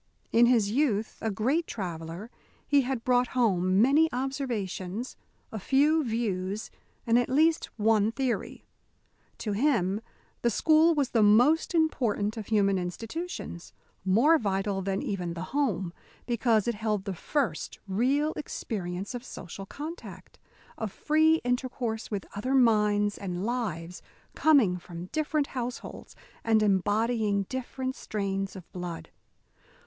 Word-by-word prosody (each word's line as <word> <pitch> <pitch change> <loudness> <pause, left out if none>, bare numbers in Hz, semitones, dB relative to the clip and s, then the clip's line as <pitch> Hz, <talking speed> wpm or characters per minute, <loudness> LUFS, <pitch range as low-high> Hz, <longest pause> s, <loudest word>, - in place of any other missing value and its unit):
In 235 +1 +6
his 225 -5 +3
youth 225 -5 0
a 220 - 0
great 260 - 0
traveller, 175 +2 -6 0.4
he 285 -1 +4
had 255 -2 -3
brought 250 0 +3
home 190 -4 +3
many 300 +5 +4
observations, 245 -5 -3 0.4
a 220 - -4
few 295 - +3
views, 215 -4 -2 0.3
and 235 +1 +4
at 245 - -1
least 315 +5 +3
one 215 0 +3
theory. 260 0 -3 0.7
To 215 - -3
him 205 -4 +1 0.4
the 240 - +3
school 315 +7 +4
was 280 -4 +1
the 230 - +3
most 245 - +4
important 230 -10 +1
of 220 -3 -6
human 200 -3 +2
institutions 225 - -6 0.3
more 240 - +4
vital 195 -1 -1
even 195 0 -1 0.3
than - - -4
the 170 - -4
home, 210 -11 0 0.3
because 235 -3 +2
it 235 - +1
held 210 -2 -2
the 195 - -3
first 210 - -2
real 265 +10 +1
experience 195 -9 -4
of 245 -1 -5
social 195 -4 -8
contact, 315 - -9 0.4
of 220 -3 -3
free 315 +5 +3
intercourse 245 -2 -2
with 205 -3 -3
other 255 +7 -1
minds 210 -4 +3
and 185 -1 -4
lives 185 -8 -3 0.3
coming 255 -13 +4
from 175 +1 -9
different 310 -1 0
households 250 -1 -6 0.3
and 220 -1 +3
embodying 210 +1 +1
different 260 +3 -4
strains 195 -2 -3
of 185 -3 -10
blood. 175 -3 -6
225 Hz, 130 wpm, -28 LUFS, 195-265 Hz, 0.7 s, In